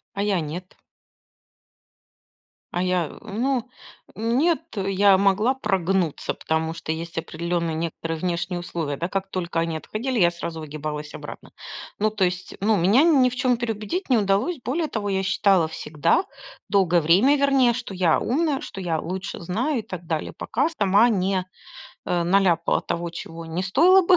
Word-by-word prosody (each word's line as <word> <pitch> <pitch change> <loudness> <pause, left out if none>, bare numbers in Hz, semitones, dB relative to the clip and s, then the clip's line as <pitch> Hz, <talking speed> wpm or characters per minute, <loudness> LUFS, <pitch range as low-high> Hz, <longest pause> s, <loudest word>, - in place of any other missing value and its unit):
А 200 - -2
я 200 -4 +1
нет. 170 +4 -6 2.0
А 175 - 0
я, 180 -2 +1
э, - - -12
ну, 250 +3 0 0.5
нет, 255 +10 +2 0.2
э, 195 0 -1
я 195 0 +5
могла 200 +6 +3
прогнуться, 190 - 0
потому 160 0 -2
что 165 -1 -5
есть 165 +1 -5
определенные 170 0 -2
некоторые 165 0 -3
внешние 175 +1 -2
условия, 160 -5 -4
да, 170 - -2
как 195 0 -3
только 175 -3 -2
они 165 -1 -1
отходили, 235 +8 -3
я 175 -2 +5
сразу 170 -1 -6
выгибалась 150 0 -6
обратно. - - -9 0.5
Ну, 215 +1 +3
то 210 -3 +1
есть, 180 0 -4
ну, 215 +1 +3
меня 205 - +4
ни 280 -7 +5
в 250 - -7
чем 250 -1 +2
переубедить 230 - -3
не 245 - +5
удалось. 205 - +1
Более 310 +6 -1
того, 205 -5 -3
я 190 0 0
считала 190 -3 +3
всегда, 160 - 0 0.5
долгое 180 -4 +3
время, 200 - +4
вернее, 275 -3 +4
что 235 -4 -6
я 180 -3 +3
умная, 290 +2 0
что 195 - -7
я 165 -3 -1
лучше 185 +4 -5
знаю 235 - -1
и - - -3
так 185 -5 -8
далее, 160 -2 -3
пока 260 +8 0
сама 205 - +4
не, 190 -2 0 0.6
э, 175 -1 +1
наляпала 175 -2 +2
того, 170 0 -3
чего 165 0 -8
не 165 +3 -3
стоило 350 - +5
бы, 365 - +7
190 Hz, 165 wpm, -24 LUFS, 170-230 Hz, 2.0 s, бы